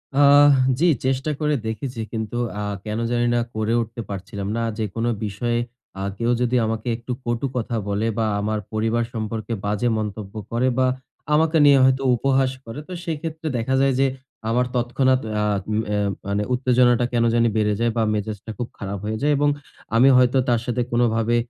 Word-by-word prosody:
আহ! 145 +1 +7 0.3
জি 170 - +3 0.2
চেষ্টা 135 +3 0
করে 150 -1 +1
দেখেছি। 115 +2 -4
কিন্তু 110 0 -3 0.2
আ - - -2 0.2
কেন 105 +1 -3
জানি 120 0 +1
না - - +3 0.2
করে 110 +1 0
উঠতে 115 +1 -6
পারছিলাম 100 0 -5
না। 115 - 0
যেকোন 110 +1 -2 0.2
বিষয়ে 120 +4 -1 0.4
আ - - -3
কেউ 120 +2 +1
যদি 125 0 +1
আমাকে 110 +2 -3
একটু 120 +2 -7
কটু 120 +3 -1
কথা 120 -1 -2
বলে 100 +2 0
বা 115 - +1
আমার 105 +1 -1
পরিবার 115 +2 +1
সম্পর্কে 110 0 -4
বাজে 105 +4 0
মন্তব্য 105 -2 -5 0.2
করে 120 +2 +1
বা 130 0 +3 0.5
আমাকে 160 +2 +3
নিয়ে 140 -1 +7
হয়তো 130 +1 +3
উপহাস 135 +1 +2
করে। 115 +5 -7
তো 185 - -7
সেক্ষেত্রে 160 0 -4
দেখা 120 +3 0
যায় 135 -1 +3
যে, 135 - +4 0.4
আমার 125 +2 +2
তৎক্ষণাৎ 130 +2 +2 0.2
আ - - +1 0.3
উ - - 0 0.2
এ্যা 105 0 +1 0.3
মানে 100 +1 0
উত্তেজনাটা 125 -1 +3
কেন 120 -1 +2
জানি 115 0 +3
বেড়ে 105 -1 +2
যায় 115 0 +2
বা 115 - +3
মেজাজটা 105 +1 -4
খুব 120 - -3
খারাপ 100 0 -4
হয়ে 110 +1 -2
যায়। 150 +1 +2
এবং 145 0 +3 0.5
আমি 125 +4 +6
হয়তো 125 +1 +4
তার 120 -2 +2
সাথে 125 0 -1
কোনোভাবে 120 -1 +2
120 Hz, 180 wpm, -22 LUFS, 110-130 Hz, 0.5 s, আহ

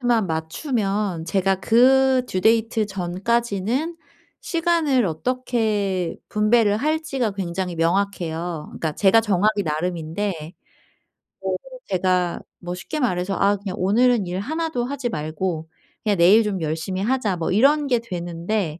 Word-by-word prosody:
due만 240 -4 +2
맞추면 195 - -2
제가 195 +1 +1
그 260 +3 +4
due 185 - -2
date 225 +1 +2
전까지는 210 - -1 0.4
시간을 330 -7 +1
어떻게 205 -2 -1
분배를 210 0 +3
할지가 280 -5 -1
굉장히 180 -2 -3
명확해요. 170 -2 -1
그러니까 160 -2 -3
제가 200 +7 +4
정하기 210 0 +1
나름인데 165 +4 -2 1.1
네네. - - -1 0.3
제가 180 -1 0 0.2
뭐 175 0 -5
쉽게 305 +12 -5
말해서 195 -6 0
“아 200 +1 +3
그냥 195 -2 -5
오늘은 225 +2 +3
일 180 +1 -3
1 320 +9 -2
도 245 -6 -2
하지 270 -1 -3
말고 160 -1 -3 0.3
그냥 210 -3 +1
내일 190 +7 +6
좀 205 -3 -2
열심히 160 +4 -2
하자.“ 220 -4 0
뭐 165 - -2
이런 280 +8 +4
게 245 -3 +2
되는데 175 -3 -3
200 Hz, 295 characters per minute, -22 LUFS, 180-240 Hz, 1.1 s, 내일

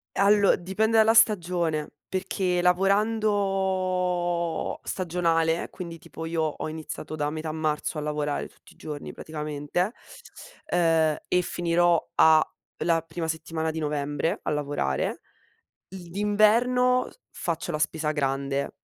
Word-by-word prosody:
Allo 200 0 +5
dipende 210 +5 0
dalla 220 +1 +5
stagione, 175 -8 +3 0.2
perché 185 -1 -1
lavorando 185 -3 +1
stagionale, 165 -2 0
quindi 170 -3 -7
tipo 160 0 -8
io 165 -1 0
ho 155 0 -3
iniziato 155 0 -6
da 150 -1 -1
metà 155 0 -4
marzo 155 0 -2
a - - -2
lavorare 150 -1 -2
tutti - - -21
i - - -28
giorni 150 -2 -7
praticamente, 150 +4 -3 0.8
uhm, 165 -3 +3
e 180 - +3
finirò 175 -1 +1
a 160 -1 +6 0.4
la 165 0 +2
prima 165 +1 -5
settimana 160 0 -2
di 160 - -4
novembre, 150 +3 -1
a - - -1
lavorare. 145 - -1 0.7
I 180 -2 -10
d'inverno 230 +6 +3 0.2
faccio 170 0 -3
la 150 - -1
spesa 155 0 -1
grande 140 -1 -1
170 Hz, 120 wpm, -26 LUFS, 155-190 Hz, 0.8 s, a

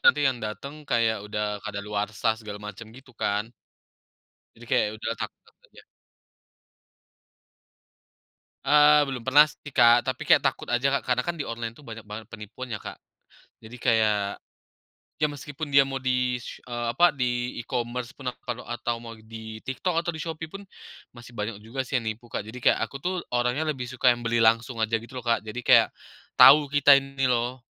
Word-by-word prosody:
nanti 145 0 +5
yang 130 -3 +1
datang, 140 +8 -6
kayak, 115 -2 +1
udah 105 -1 -2
kadaluarsa 105 +2 -2
segala 105 -2 -7
macam, 105 +2 -9
gitu 130 +3 -16
kan. 105 +1 -2 1.0
Jadi, 120 - -14
kayak, - - +4
ya 105 - -6
udahlah, 110 - -4
takut - - -6 0.3
aja. - - -18 2.8
Eee, 150 0 +6
belum 135 -3 -5
pernah 130 +5 +6
sih 150 - -12
Kak. 120 -1 +5
Tapi, 130 0 -2
kayak, - - +6
takut - - -1
aja 120 +3 +2
Kak, - - -3
karena 125 -1 +1
kan 170 +6 -3
di 145 - -3
online 115 0 -5
tuh, 150 - -16
banyak 115 -2 -8
banget 110 +1 -7
penipuan 110 +4 -8
ya 105 - -4
Kak. - - -8 0.6
Jadi, 110 +2 -12
kayak, 105 -4 +2 0.8
ya 155 - +3
meskipun 145 +1 -7
dia 140 - +8
mau 135 0 -4
di 125 -1 0
se 120 - -10
eee, 120 -1 -4
apa, 175 +5 +6
di 125 -2 -2
e-commerce 120 +1 -4
pun 130 -3 -4
atau - - -25
kalau 120 0 -3
atau 120 0 -3
mau 115 -1 -9
di 110 0 -9
TikTok 165 +6 -1
atau 170 -1 -3
di 160 - -5
Shopee 160 -1 -5
pun, 195 +5 -9 0.5
masih 120 0 -14
banyak 105 0 -4
juga 115 +5 -4
sih, 130 0 -1
yang 115 - -7
nipu 115 +2 -6
Kak. 105 - -4
Jadi, 125 +3 -9
kayak, - - -1
aku - - -16
tuh 185 0 -1 0.2
orangnya, 125 +6 0
lebih 130 -5 -3
suka 125 -1 +3
yang 120 - -9
beli 115 +1 +1
langsung 115 +2 +2
aja, 110 +1 +1
gitu 115 +3 -6
loh 125 - -13
Kak. 115 -2 +2
Jadi, 110 +3 -6
kayak, 125 - +5 0.5
tahu 145 -1 +8
kita 145 0 +7
ini 135 -1 0
loh. 125 +1 0
120 Hz, 185 wpm, -26 LUFS, 110-135 Hz, 2.8 s, dia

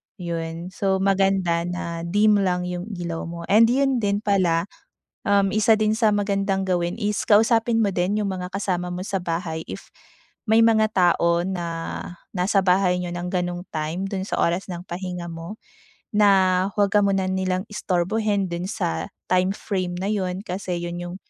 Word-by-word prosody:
yun 170 -1 -5
so 190 +1 0
maganda 195 -3 +2
na 170 -1 -4
dim 205 +3 +4
lang 180 -2 0
yung 180 +2 -4
ilaw 170 -2 -4
mo 170 0 -7
and 220 +3 +7
yun 265 +1 +2
din 205 0 0
pala, 180 -5 +2 0.6
um, 200 -1 +3
isa 215 +1 +4
din 215 0 +1
sa 220 -3 +3
magandang 200 -1 0
gawin 175 -1 0
is 210 -1 -1
kausapin 225 +2 +4
mo 205 - +2
din 195 +3 0
yung 200 - -1
mga 180 0 -6
kasama 180 -3 -2
mo 180 - -4
sa 200 - -1
bahay 165 -2 -3
if - - -9 0.6
may 220 +1 +5
mga 220 -1 +4
tao 170 -2 +3
na 180 -3 -3 0.7
nasa 190 +2 +1
bahay 180 -1 +3
niyo 175 -1 -4
ng 175 +1 -4
ganong 175 -1 -2
time 155 +3 -3
dun 190 -1 -3
sa - - -2
oras 175 +3 +1
ng 175 -2 -6
pahinga 180 -1 -5
mo 165 +4 -7 0.6
na 190 -3 +4
huwag 205 -2 +2
ka 210 - +4
muna 195 -1 +1
nilang 185 0 -1
istorbohin 205 0 0
dun 170 +1 -3
sa 190 -5 -2 0.2
time 185 +1 +2
frame 185 -4 -3
na 190 +3 -2
yun 185 -2 -2
kasi 185 -3 -4
iyon 175 0 -4
yung 175 0 -6
185 Hz, 170 wpm, -23 LUFS, 175-205 Hz, 0.7 s, and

